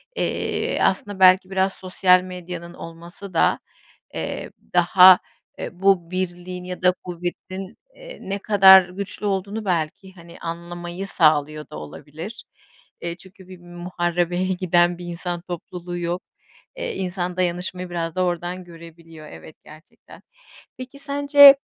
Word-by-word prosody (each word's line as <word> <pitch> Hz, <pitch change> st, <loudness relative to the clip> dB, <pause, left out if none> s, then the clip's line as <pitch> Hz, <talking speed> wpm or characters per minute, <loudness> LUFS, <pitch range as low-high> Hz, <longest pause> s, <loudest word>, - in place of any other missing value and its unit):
Eee, -, -, -1 dB
aslında, 205 Hz, -8 st, 0 dB
belki 185 Hz, 0 st, +6 dB
biraz 190 Hz, 0 st, +1 dB
sosyal 185 Hz, 0 st, +3 dB
medyanın 180 Hz, -1 st, -8 dB
olması 170 Hz, +4 st, -10 dB
da, 165 Hz, -, +3 dB, 0.5 s
eee, -, -, -5 dB, 0.2 s
daha, 180 Hz, +1 st, +7 dB, 0.4 s
eee, -, -, -4 dB
bu 190 Hz, -3 st, +3 dB
birliğin 180 Hz, 0 st, -4 dB
ya 180 Hz, 0 st, -7 dB
da 180 Hz, 0 st, +4 dB
kuvvetin, 185 Hz, +3 st, -6 dB, 0.2 s
eee, -, -, -11 dB
ne 195 Hz, +1 st, -4 dB
kadar 190 Hz, -3 st, +7 dB
güçlü 200 Hz, +2 st, -5 dB
olduğunu, 200 Hz, +2 st, -2 dB
belki, 180 Hz, +1 st, -2 dB
hani, 170 Hz, -2 st, -14 dB
anlamayı 175 Hz, +2 st, -6 dB
sağlıyor 155 Hz, -3 st, +2 dB
da -, -, -8 dB
olabilir. 150 Hz, -, -9 dB, 0.6 s
Eee, 170 Hz, 0 st, -4 dB
çünkü 190 Hz, 0 st, -16 dB
bir 185 Hz, -1 st, -12 dB
muharebeye 175 Hz, 0 st, -2 dB
giden 175 Hz, -2 st, +2 dB
bir 175 Hz, -, -7 dB
insan 175 Hz, 0 st, -4 dB
topluluğu 175 Hz, 0 st, -7 dB
yok. 175 Hz, +1 st, -3 dB, 0.5 s
Eee, -, -, -4 dB
insan 180 Hz, -1 st, -3 dB
dayanışmayı 180 Hz, 0 st, -2 dB
biraz 165 Hz, -2 st, -3 dB
da 185 Hz, -, +1 dB
oradan 175 Hz, +1 st, -3 dB
görebiliyor, 165 Hz, -2 st, -13 dB
evet, 155 Hz, -, -12 dB
gerçekten. 155 Hz, +1 st, -16 dB, 0.6 s
Peki, 255 Hz, +2 st, -9 dB
sence, 285 Hz, 0 st, +7 dB
180 Hz, 130 wpm, -22 LUFS, 170-190 Hz, 0.6 s, daha